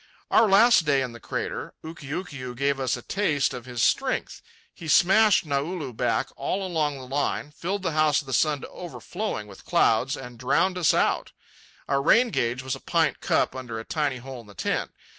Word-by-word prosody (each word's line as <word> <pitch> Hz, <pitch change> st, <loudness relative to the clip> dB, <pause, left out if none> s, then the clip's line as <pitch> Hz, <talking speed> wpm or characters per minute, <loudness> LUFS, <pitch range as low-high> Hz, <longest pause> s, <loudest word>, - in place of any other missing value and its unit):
Our 225 Hz, -, +6 dB
last 210 Hz, 0 st, +6 dB
day 140 Hz, -3 st, +2 dB
in 125 Hz, -, -4 dB
the 120 Hz, -, -11 dB
crater, -, -, -5 dB
Ukiukiu 145 Hz, -4 st, -6 dB
gave 140 Hz, 0 st, 0 dB
us 130 Hz, -1 st, 0 dB
a -, -, -11 dB
taste 160 Hz, -9 st, 0 dB
of 125 Hz, -1 st, -7 dB
his 120 Hz, -2 st, -2 dB
strength. -, -, 0 dB, 0.3 s
He 165 Hz, -, -10 dB
smashed 195 Hz, +6 st, +5 dB
Naulu 145 Hz, -1 st, -2 dB
back -, -, 0 dB
all 195 Hz, +1 st, -2 dB
along 155 Hz, -5 st, -1 dB
the 130 Hz, -, -9 dB
line, 145 Hz, +2 st, -2 dB
filled 190 Hz, +6 st, -4 dB
the 180 Hz, -, 0 dB
House 155 Hz, -1 st, +3 dB
of 150 Hz, -, -7 dB
the 135 Hz, -, -6 dB
Sun 150 Hz, +1 st, +2 dB
to -, -, -8 dB
overflowing 180 Hz, -, -5 dB
with 100 Hz, -2 st, -14 dB
clouds, 125 Hz, +5 st, +2 dB
and 125 Hz, -3 st, -10 dB
drowned 180 Hz, +9 st, +1 dB
us 170 Hz, -, +3 dB
out. -, -, +1 dB, 0.5 s
Our 140 Hz, 0 st, +1 dB
rain 230 Hz, -, +4 dB
gauge 120 Hz, -2 st, -1 dB
was 130 Hz, -1 st, -2 dB
a -, -, -10 dB
pint -, -, +1 dB
cup -, -, +1 dB
under 120 Hz, -4 st, -5 dB
a 110 Hz, -, -8 dB
tiny 145 Hz, -4 st, -1 dB
hole 130 Hz, 0 st, -8 dB
in 110 Hz, -, -18 dB
the 100 Hz, -, -15 dB
tent. -, -, -1 dB
145 Hz, 200 wpm, -25 LUFS, 130-175 Hz, 0.5 s, Our